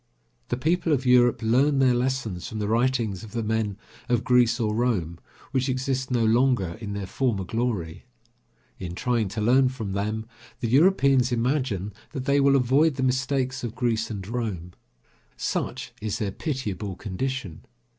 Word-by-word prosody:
The 120 - -2
people 165 +4 +1
of 135 -2 0
Europe 125 -2 +4
learn 135 +6 +3
their 130 -2 +4
lessons 120 -7 -2
from 110 - -6
the 105 -1 -2
writings 115 -4 0
of 110 - -11
the 115 -1 -2
men 110 -2 -1 0.3
of 120 -1 +2
Greece 125 -1 +3
or 110 -2 0
Rome, 100 -8 -1 0.3
which 130 0 0
exist 130 0 -1
no 120 -3 +1
longer 115 -6 +2
in 100 -2 -5
their 100 -1 -4
former 110 -1 -1
glory. 110 -5 -3 0.7
In 90 -2 -5
trying 120 -1 0
to 110 +3 -4
learn 130 +4 +4
from 115 -6 -5
them, 105 +3 -2 0.3
the 115 - -1
Europeans 135 -3 +4
imagine 120 -5 -1 0.2
that 130 -1 -4
they 140 0 +3
will 140 0 +4
avoid 135 +4 +3
the 130 - -2
mistakes 130 0 0
of 120 -1 -4
Greece 115 -3 0
and 100 -4 -6
Rome. 105 -7 -4 0.6
Such - - -3
is 110 0 -2
their 105 -4 -2
pitiable 105 - -4
condition. 105 -1 -4
120 Hz, 165 wpm, -25 LUFS, 105-130 Hz, 0.7 s, Europe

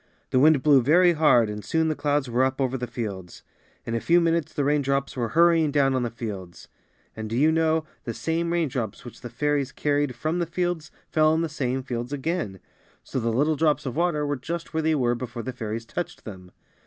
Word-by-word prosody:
The 130 - +3
wind 150 -1 +5
blew 145 -3 +6
very 175 +7 +5
hard 150 -8 +4
and 105 0 -6
soon 160 0 +1
the 155 - +1
clouds 145 -2 0
were 120 +2 +1
up 130 +1 0
over 130 -1 0
the 125 -1 -3
fields. 100 -7 -6 0.4
In 115 - -4
a 115 - 0
few 170 +8 +4
minutes 165 -2 +1
the 145 - -1
raindrops 140 -1 0
were 120 -3 -1
hurry 170 -1 +5
ing 155 - +1
down 140 -2 +2
on 130 - +1
the 120 - -1
fields. 100 -7 -8 0.5
And, 110 -1 -6
do 115 - -2
you 155 +4 +4
know, 160 0 +1 0.2
the 115 - -3
same 170 +1 -1
raindrops 130 -12 -2
which 120 - -11
the 120 - -7
fairies 140 +2 -1
carried 145 -3 0
from 155 +9 -2
the 170 - -1
fields 175 -2 -2 0.2
fell 155 0 +3
on 160 - +1
the 165 - -2
same 130 -3 -2
fields 120 -1 -4
again! 145 - -3 0.4
So - - -3
the 115 -1 0
little 145 +7 +2
drops 150 -1 +1
of 130 - -4
water 165 -3 +1
were 145 -1 -1
just 165 +6 -6
where 160 - 0
they 160 0 +2
were 120 -4 +1
before 120 -1 -5
the 130 - -5
fairies 115 -1 -5
touched 175 +9 -6
them. 90 -4 -10
140 Hz, 225 wpm, -25 LUFS, 120-160 Hz, 0.5 s, blew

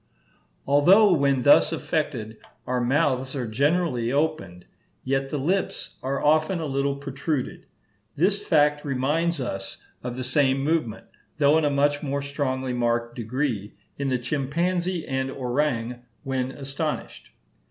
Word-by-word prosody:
Although 180 +9 +6
when 140 -4 +2
thus 145 - +6
affected, 135 -9 -2 0.3
our 125 0 -1
mouths 130 0 +1
are 130 -3 -2
generally 130 0 +1
opened, 145 - -1 0.4
yet 135 +1 -1
the 150 - -2
lips 180 +8 -2
are 135 +1 -2
often 155 +4 +3
a 160 - -3
little 140 0 0
protruded. 140 0 -4 0.5
This 195 +7 +1
fact 150 -4 +3
reminds 150 +5 0
us 95 -7 -5 0.2
of 125 0 -5
the 130 - -3
same 135 +1 +2
movement, 150 -8 -1 0.3
though 145 0 +4
in 155 - 0
a - - +3
much 145 +1 +1
more 140 -1 -2
strongly 130 -2 -2
marked 120 -1 0
degree, 115 -3 -3 0.2
in 140 -1 -1
the 130 - +1
chimpanzee 170 +7 -1
and 130 -1 -1
orang 125 -2 -1 0.2
when 130 -2 -1
astonished. 140 +3 -5
140 Hz, 135 wpm, -25 LUFS, 125-150 Hz, 0.5 s, Although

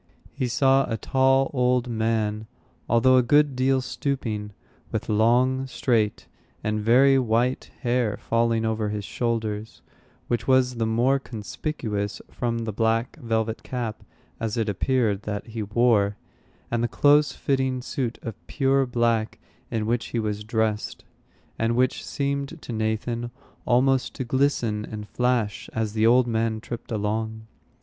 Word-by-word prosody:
He 130 0 -1
saw 135 +2 +3
a 115 - 0
tall 135 +2 +2
old 125 -1 +2
man, 110 -2 -1 0.4
although 130 +3 +5
a - - +6
good 145 +2 +3
deal 130 +1 +2
stooping, 115 -6 -3 0.4
with - - -3
long, 125 +5 +3
straight, 120 -4 0 0.4
and 105 0 0
very 130 +5 +5
white 120 +1 0
hair 120 -4 0
falling 115 -1 +1
over 110 -1 -1
his 105 -1 -4
shoulders, 110 -2 -3 0.4
which 120 - -1
was 130 -2 +3
the 115 -1 0
more 120 +5 +2
conspicuous 110 -3 -4
from 115 -1 -2
the 110 - -2
black 115 +3 0
velvet 110 -1 -1
cap, 120 -4 -4 0.4
as 115 0 -2
it 115 -1 0
appeared, 110 0 +1
that 105 -1 -4
he 115 -1 -6
wore, 105 -1 +2 0.5
and 120 0 0
the - - +2
close 145 +3 +4
fitting 130 -2 0
suit 125 -1 -3
of 115 - -4
pure 135 -1 +2
black 115 -2 0 0.3
in 110 -2 -1
which 115 +1 0
he 120 - -2
was 105 -1 -2
dressed, 110 -1 -2 0.5
and 115 +1 +1
which 130 +1 +1
seemed 140 +3 -3
to 120 - -7
Nathan 110 +2 -2 0.4
almost 130 +1 +2
to - - -3
glisten 120 -4 0
and 105 -1 -7
flash 125 -3 -1
as 110 -2 -2
the 110 0 +3
old 125 +1 +5
man 115 -1 0
tripped 120 +2 -8
along. 110 +1 -2
115 Hz, 145 wpm, -25 LUFS, 110-130 Hz, 0.5 s, a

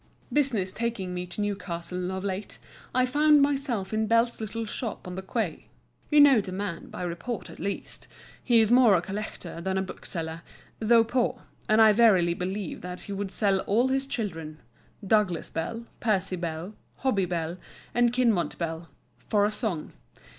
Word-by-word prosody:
Business 240 -11 +1
taking 215 -5 -3
me 180 0 -4
to 180 +4 -5
Newcastle 180 -3 -3
of 190 0 -4
late, 195 +1 -4 0.3
I 255 0 +3
found 295 +2 +5
myself 270 -9 0
in 220 0 +1
Bell's 230 +1 +2
little 225 +1 -3
shop 220 0 -4
on 180 - -6
the 190 - -4
quay. 190 -3 -3 0.4
You 300 - +5
know 275 -6 +7
the 190 - -7
man 190 -2 -4
by - - -6
report 175 +7 -4
at - - -13
least; 200 - -5 0.4
he 235 -3 +5
is 220 0 +2
more 245 -5 +7
a 170 - +2
collector 195 -4 -6
than 190 +2 -1
a 190 - +1
bookseller, 165 -3 -6 0.4
though 230 +1 +5
poor; 245 +2 -1 0.3
and 215 +1 +5
I 220 -1 +8
verily 200 -6 +5
believe 185 +2 -4
that 180 +1 -6
he - - -7
would 200 0 -3
sell 195 -1 +1
all 235 +6 +3
his 270 +1 0
children—Douglas 175 - -2
Bell, 230 +8 -4
Percy 195 -5 0
Bell, 170 +2 -4 0.3
Hobbie 210 -8 +2
Bell, 170 0 -2 0.4
and 240 0 +3
Kinmont 235 -8 +1
Bell—"for 165 - -2
a 210 - +1
song." 210 -8 -3
205 Hz, 165 wpm, -27 LUFS, 180-230 Hz, 0.4 s, I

